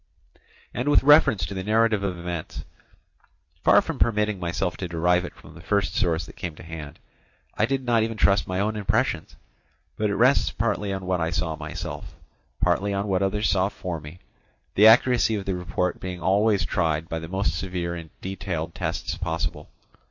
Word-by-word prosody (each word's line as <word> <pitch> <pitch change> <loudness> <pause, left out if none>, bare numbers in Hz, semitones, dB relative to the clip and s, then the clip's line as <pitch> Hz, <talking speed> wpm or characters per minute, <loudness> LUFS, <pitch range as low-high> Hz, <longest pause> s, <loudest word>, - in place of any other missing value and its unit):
And 125 +4 -1
with 145 - +5
reference 135 - +6
to 100 - -6
the 95 -1 -4
narrative 110 0 +2
of 95 -3 -2
events, 85 -2 -6 1.0
far - - +6
from - - -5
permitting 105 -3 +1
myself 90 0 -2
to 90 - -4
derive 90 +1 +1
it - - -9
from - - -15
the 85 - -12
first 100 +2 0
source 80 -2 0
that - - -13
came 85 -3 -5
to - - -12
hand, 80 -2 -8 0.6
I 110 - +2
did 135 0 -1
not 120 -2 +3
even 110 0 -2
trust 100 -2 +3
my 95 0 -2
own 105 +2 0
impressions, 105 -2 -1 0.6
but 105 -1 0
it 100 - -1
rests 130 +4 +4
partly 105 -2 -1
on 95 -1 -4
what 90 -1 0
I 80 - 0
saw 85 -2 -2
myself, 75 0 -7 0.4
partly 100 +1 +1
on 100 +1 -2
what 95 -1 +1
others 105 +2 +1
saw 95 0 +2
for 90 -5 -5
me, 75 +3 -11 0.6
the 105 +2 +7
accuracy 120 0 +5
of 100 -2 -4
the 95 - -1
report 90 0 -2
being 90 -1 -5
always 100 +1 +2
tried 80 +2 0
by 80 -2 -3
the 80 - -7
most 95 -4 -1
severe 85 0 -3
and 85 -2 -7
detailed 90 -4 -4
tests - - -3
possible. 80 -3 -3
95 Hz, 190 wpm, -25 LUFS, 85-105 Hz, 1.0 s, the